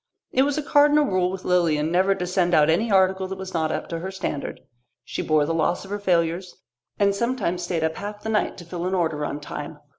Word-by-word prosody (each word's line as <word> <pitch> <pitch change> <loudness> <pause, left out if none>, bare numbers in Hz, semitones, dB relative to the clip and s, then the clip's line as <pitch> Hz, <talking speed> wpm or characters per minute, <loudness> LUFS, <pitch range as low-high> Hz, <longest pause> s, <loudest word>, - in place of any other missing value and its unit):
It 260 - +3
was 285 +1 +1
a 305 - -1
cardinal 295 +1 +4
rule 185 -6 +1
with 185 0 -6
Lilian 165 -4 +2
never 190 +3 +3
to 180 -2 -3
send 180 -1 +1
out 150 0 +5
any 215 +8 +1
article 190 0 +3
that 190 0 -6
was 190 0 -7
not 160 -2 0
up - - -3
to 165 - -3
her 185 +3 -5
standard. 180 -6 -4 0.4
She - - -4
bore 155 -1 +2
the 165 - -1
loss 165 +3 0
of 195 - -11
her 205 - -2
failures, 175 -1 0 0.4
and 200 -1 +3
sometimes 210 -5 -1
stayed 175 -2 -2
up 160 0 -1
half 205 +1 -5
of 205 - -22
the 220 - -3
night 215 -1 0
to 175 - -10
fill 175 +1 -4
an 190 - 0
order 160 -4 0
on 145 0 -3
time. 150 - -7
180 Hz, 245 wpm, -24 LUFS, 165-195 Hz, 0.4 s, out